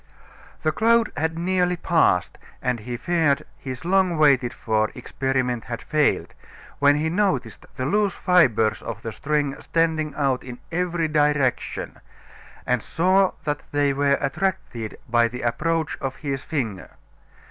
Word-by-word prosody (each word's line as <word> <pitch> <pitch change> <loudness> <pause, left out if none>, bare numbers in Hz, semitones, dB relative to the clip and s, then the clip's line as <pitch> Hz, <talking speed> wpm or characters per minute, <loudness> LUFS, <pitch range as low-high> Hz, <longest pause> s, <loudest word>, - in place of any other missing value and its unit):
The 155 - +2
cloud 230 +4 +3
had 160 +1 -1
nearly 180 +1 +1
passed 165 - +1 0.2
and 125 -1 -1
he 120 +3 -5
feared 155 -1 +1
his 130 +3 -7
long 185 -2 +2
waited 135 -5 +4
for 110 -1 0
experiment 125 -1 -2
had - - -5
failed, - - +1 0.5
when 145 0 +5
he 150 +2 0
noticed 195 +4 -1
the 130 -2 -3
loose 200 +5 +1
fibers 125 - +3
of 115 -1 -7
the 115 - -4
string 145 +2 -1
standing 160 -2 0
out 135 -3 0
in 125 -1 -8
every 175 -1 0
direction, 150 -4 0 0.7
and 125 -2 +1
saw 185 - +2
that 145 0 -2
they 145 -1 +2
were 140 0 +2
attracted 135 - -2
by 120 0 +3
the 125 +1 -7
approach 160 +7 -1
of 135 -1 -3
his 140 -3 -4
finger. 115 -12 -4
145 Hz, 140 wpm, -23 LUFS, 125-165 Hz, 0.7 s, when